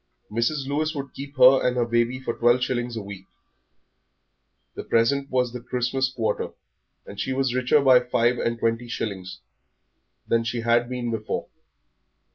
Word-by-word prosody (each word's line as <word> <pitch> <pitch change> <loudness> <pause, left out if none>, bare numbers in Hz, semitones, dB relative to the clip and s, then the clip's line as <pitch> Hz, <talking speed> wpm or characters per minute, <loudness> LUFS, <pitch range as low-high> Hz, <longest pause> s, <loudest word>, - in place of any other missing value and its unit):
Mrs. 125 +6 0
Lewis 155 +3 -1
would 140 -2 -6
keep 140 +1 -9
her 130 +1 +8
and 125 0 +1
her 120 - +2
baby 120 +2 0
for 130 -3 -3
twelve 120 +2 +3
shillings 120 -2 -2
a 110 - -4
week; 100 -1 -10 1.5
the - - -7
present 140 +5 +1
was 125 -2 0
the 125 - -6
Christmas 125 +2 -1
quarter, 115 -3 -2 0.5
and 100 - -10
she 130 - -1
was 135 -2 0
richer 130 +3 +3
by 130 -2 +6
five 125 0 +1
and 115 0 -1
twenty 115 +1 -1
shillings 95 -5 -5 0.9
than 115 0 +2
she 115 0 -3
had 120 +1 +2
been 125 -2 -3
before. 110 -1 -3
120 Hz, 160 wpm, -24 LUFS, 115-130 Hz, 1.5 s, her